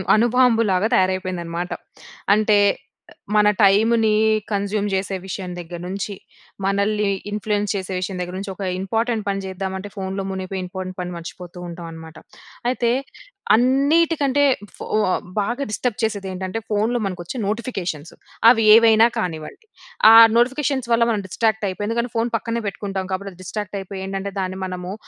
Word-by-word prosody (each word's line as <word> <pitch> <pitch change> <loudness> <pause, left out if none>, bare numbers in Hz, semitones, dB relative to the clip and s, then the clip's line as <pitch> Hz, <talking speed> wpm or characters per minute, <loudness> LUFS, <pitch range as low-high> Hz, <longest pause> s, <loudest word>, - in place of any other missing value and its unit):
అణుబాంబు 240 0 +4
లాగా 185 +4 +2
తయారైపోయిందనమాట. 180 -2 -1 0.7
అంటే, 215 -1 +3 0.8
మన 210 0 +5
టైంని 220 +2 +4 0.4
కన్జ్యూమ్ 205 +1 -1
చేసే 190 0 -1
విషయం 185 -1 -5
దగ్గర 175 0 -7
నుంచి, 200 +2 -4 0.5
మనల్ని 200 +1 +1 0.2
ఇన్ఫ్లుయెన్స్ 210 0 -1
చేసే 190 -1 -4
విషయం 185 0 -4
దగ్గర 180 0 -5
నుంచి, 195 0 -5
ఒక 200 - -6 0.2
ఇంపార్టెంట్ 225 +3 -1
పని 195 0 -1
చేద్దామంటే 190 +1 -5
ఫోనులో 195 0 -4
మునిగిపోయి, 190 0 -4
ఇంపార్టెంట్ 185 0 -7
పని 180 0 -4
మర్చిపోతూ 175 +1 -9
ఉంటామనమాట. 165 -2 -9 0.5
అయితే, 240 -2 0 0.7
అన్నీటికంటే, 285 +3 +3 0.3
ఫో - - -7 0.5
బాగా 235 +7 -1
డిస్టర్బ్ 240 +1 -2
చేసేది 205 -3 -1
ఏంటంటే 185 +3 -4
ఫోనులో 220 +3 +1
మనకొచ్చే 180 +4 -5
నోటిఫికేషన్స్. 190 - -4 0.4
అవి 225 -2 +2
ఏవైనా 225 0 +6
కానివ్వండి. 165 - -5 0.5
ఆహ్, 225 0 +10
నోటిఫికేషన్స్ 260 +1 +1
వల్ల 230 0 +4
మనం 210 -2 -1
డిస్ట్రాక్ట్ 220 +2 0
అయిపోయి, 205 +2 -4
ఎందుకంటే 235 +1 -1
ఫోను 230 +1 0
పక్కనే 230 +1 -3
పెట్టుకుంటాం 195 -1 -4
కాబట్టి 195 +1 -4
అది 180 - -21
డిస్ట్రాక్ట్ 205 +1 -5
అయిపోయి 190 0 -7
ఏంటంటే 195 +1 -4
దాన్ని 185 0 -3
మనము, 180 0 -5
200 Hz, 135 wpm, -21 LUFS, 185-225 Hz, 0.8 s, ఆహ్